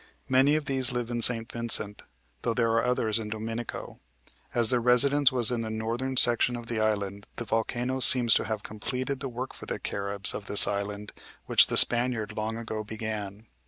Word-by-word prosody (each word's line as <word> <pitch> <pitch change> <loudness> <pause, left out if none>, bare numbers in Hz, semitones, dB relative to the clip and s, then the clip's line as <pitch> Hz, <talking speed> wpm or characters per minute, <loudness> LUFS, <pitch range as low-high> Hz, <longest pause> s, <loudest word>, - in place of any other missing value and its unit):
Many 135 +3 +2
of 155 -1 -4
these 130 -1 +1
live 120 -1 -5
in 120 0 -4
St. 115 0 +5
Vincent, 115 -3 -2 0.4
though 115 -1 -3
there 115 -1 -1
are 115 0 0
others 115 -3 -2
in 110 -1 -8
Dominico. 115 +2 -8 0.5
As 120 -2 0
their 125 - +1
residence 135 +4 +1
was 125 -2 +1
in 120 -2 -3
the 110 - -6
northern 115 +4 -5
section 120 +1 +3
of 120 -1 -9
the 115 -1 -5
island, 100 -2 -4
the 120 - -7
volcano 120 +4 -3
seems 125 -2 +6
to - - 0
have 110 -2 -6
completed 130 +5 -5
the 135 - -6
work 125 +2 -8
for - - -13
the - - -5
Caribs 100 0 0
of 105 - -9
this 100 - +10
island 100 0 -6 0.3
which - - +5
the - - -3
Spaniard 120 -3 +1
long 110 +1 -5
ago 110 -2 -7
began. 110 -1 -8
115 Hz, 195 wpm, -25 LUFS, 110-125 Hz, 0.5 s, this